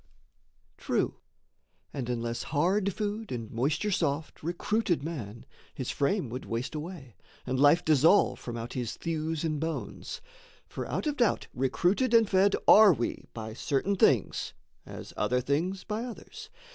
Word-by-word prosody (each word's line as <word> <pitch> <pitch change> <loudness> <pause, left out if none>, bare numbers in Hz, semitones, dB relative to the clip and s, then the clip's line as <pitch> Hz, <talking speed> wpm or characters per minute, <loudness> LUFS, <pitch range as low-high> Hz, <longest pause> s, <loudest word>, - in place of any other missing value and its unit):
True - - -1 0.7
and 130 -4 -4
unless 120 -1 -2
hard 185 +7 +1
food 210 +2 -4
and 115 -3 -5
moisture 150 - 0
soft 160 -4 -1
Recruited 175 +1 0
man, 120 -9 -6 0.3
his 130 - -3
frame 160 +3 0
would 125 +3 -5
waste 115 +6 -4
away, 150 - -7 0.3
And 130 0 -1
life 145 +5 +5
dissolve 155 +6 +4
from 120 -1 -6
out 115 +1 -6
his 120 -3 -3
thews 160 -1 -2
and 155 -2 -1
bones; 160 +1 -4 0.5
For - - -6
out - - -2
of 295 -1 -1
doubt 240 -3 +2
recruited 180 - +1
and 230 -2 +6
fed 195 +1 +3
are 210 -3 +9
we 120 -5 -3
By 110 -1 -6
certain 145 - 0
things, - - +2 0.3
as - - -9
other 125 0 +1
things 160 +9 -1
by 215 +2 -3
others. 430 - -9
160 Hz, 145 wpm, -29 LUFS, 130-200 Hz, 0.7 s, are